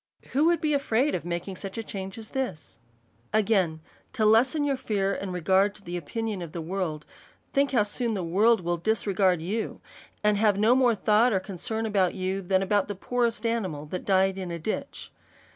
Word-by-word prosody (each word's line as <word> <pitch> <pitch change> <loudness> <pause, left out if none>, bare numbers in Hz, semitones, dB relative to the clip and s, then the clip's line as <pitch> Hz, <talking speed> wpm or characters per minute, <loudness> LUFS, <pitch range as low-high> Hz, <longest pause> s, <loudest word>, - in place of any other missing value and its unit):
Who 285 +4 +3
would 340 0 +3
be 305 -1 +1
afraid 275 0 +1
of 175 - -2
making 175 +2 -4
such 195 +2 -6
a 225 - -3
change 195 0 -6
as 220 -1 -10
this? 190 - -4 0.5
Again, 195 -7 +2 0.3
To 225 -5 +1
lesson 250 +8 +4
your 280 -1 +1
fear 200 -6 -1
and 195 -1 -4
regard 190 +4 +2
to - - -15
the 175 -2 -5
opi 225 +9 -5
nion 215 -4 -3
of 170 -3 -7
the 170 - -4
world, 165 -3 -3 0.5
think 280 0 +2
how 235 -6 +4
soon 225 +2 -2
the 190 - -2
world 205 +6 +3
will 175 0 -1
dis 220 +6 0
regard 190 -4 +2
you, 215 +6 -3 0.4
and 210 -1 +3
have 205 -1 +3
no 215 +4 +4
more 250 -3 +4
thought 215 +4 +3
or 195 - +2
concern 205 +4 -4
about 195 -4 +1
you, 190 +1 -2
than 190 +1 +1
about 205 0 +1
the 205 - -4
poorest 235 +2 -1
animal 190 -11 -1
that 180 +4 -5
died 190 0 +2
in 185 -2 -4
a 170 - -4
ditch. 170 +7 -5
200 Hz, 205 wpm, -27 LUFS, 185-225 Hz, 0.5 s, lesson